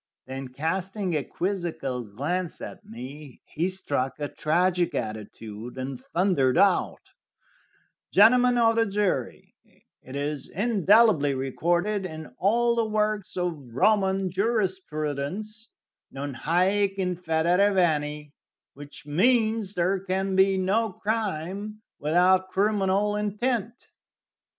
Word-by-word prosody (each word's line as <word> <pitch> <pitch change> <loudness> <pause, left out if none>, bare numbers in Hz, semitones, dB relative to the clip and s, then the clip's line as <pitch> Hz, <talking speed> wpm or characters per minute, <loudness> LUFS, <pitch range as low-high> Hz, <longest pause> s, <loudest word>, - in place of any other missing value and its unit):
Then, 130 0 -6
casting 180 +8 -3
a 145 - 0
quizzical 170 -9 -3
glance 150 - -3
at - - -8
me, 130 +4 -10
he 170 +4 -2
struck 145 -8 -2
a 145 - -2
tragic 175 +2 +1
attitude, 110 +2 -6
and 130 0 -5
thundered 170 -7 +1
out: 195 -3 +3 1.1
"Gentlemen 245 +4 +5
of 230 -1 +3
the 225 0 +3
jury, 195 - -2 0.5
it 130 - -10
is 145 0 -3
indelibly 200 - +3
recorded 175 +9 0
in 155 -4 -9
all 235 +5 +2
the 230 -2 0
works 210 -3 -1
of 155 -10 -4
Roman 195 +2 +2
jurisprudence, 190 - -2 0.4
'Non 140 +1 -5
haec 190 +8 +1
in 180 -2 -1
federe 175 +4 +2
veni,' 150 -5 0 0.4
which 145 0 -10
means 220 - +2
there 185 +3 +1
can 190 0 -2
be 190 0 +4
no 200 +3 +1
crime 210 0 -3 0.2
without 180 +5 +3
criminal 200 0 +1
intent." 225 +3 -2
185 Hz, 110 wpm, -26 LUFS, 150-205 Hz, 1.1 s, Gentlemen